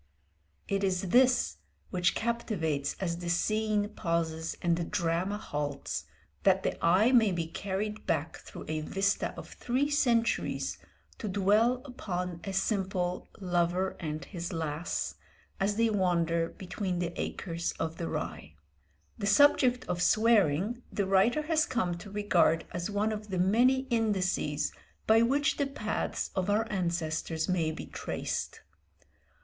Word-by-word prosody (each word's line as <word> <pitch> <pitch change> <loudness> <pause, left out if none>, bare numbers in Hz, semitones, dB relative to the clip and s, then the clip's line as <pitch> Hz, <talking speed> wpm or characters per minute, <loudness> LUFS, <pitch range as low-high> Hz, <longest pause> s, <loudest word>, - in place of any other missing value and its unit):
It 195 0 0
is 185 -1 0
this 250 +4 +4 0.3
which 180 -2 +2
captivates 175 - -1
as 170 -3 -1
the 175 -1 -4
scene 215 +3 +1
pauses 165 -4 -2
and 170 -1 +2
the 170 - -2
drama 170 +4 -1
halts, 145 -7 -4 0.4
that - - +3
the - - -2
eye 185 +8 +5
may 230 -5 +5
be 170 -2 -1
carried 200 +5 -4
back 160 0 -1
through - - -10
a 155 0 -2
vista 195 +6 0
of - - -8
three 265 +4 -1
centuries 235 -5 +1 0.4
to 215 - -4
dwell 210 +6 +3
upon 180 - -4
a 195 - -4
simple 190 -2 -1
"lover 180 0 0
and 155 -2 -4
his 170 -2 -5
lass" 160 -1 -2 0.5
as 200 +1 +1
they 230 0 +2
wander 170 -4 +1
"between 185 0 -4
the 175 -1 -2
acres 170 -2 -3
of 160 0 -4
the 170 - -3
rye." 75 +1 -5 0.6
The 200 - -1
subject 250 +2 +5
of 175 -1 -2
swearing 215 0 +3
the 200 - 0
writer 195 +10 +3
has 310 0 +2
come 185 -9 0
to 205 - -9
regard 195 -5 +2
as 175 +2 -3
one 210 +1 0
of 210 0 -5
the 190 - -2
many 240 +9 +4
indices 190 -9 0 0.3
by 220 +1 +5
which 285 +6 +2
the 285 - +1
paths 220 -6 -3
of 190 +1 0
our 215 +2 +2
ancestors 165 -3 -1
may 175 -4 +1
be - - -7
traced. - - -4
190 Hz, 145 wpm, -30 LUFS, 170-220 Hz, 0.6 s, eye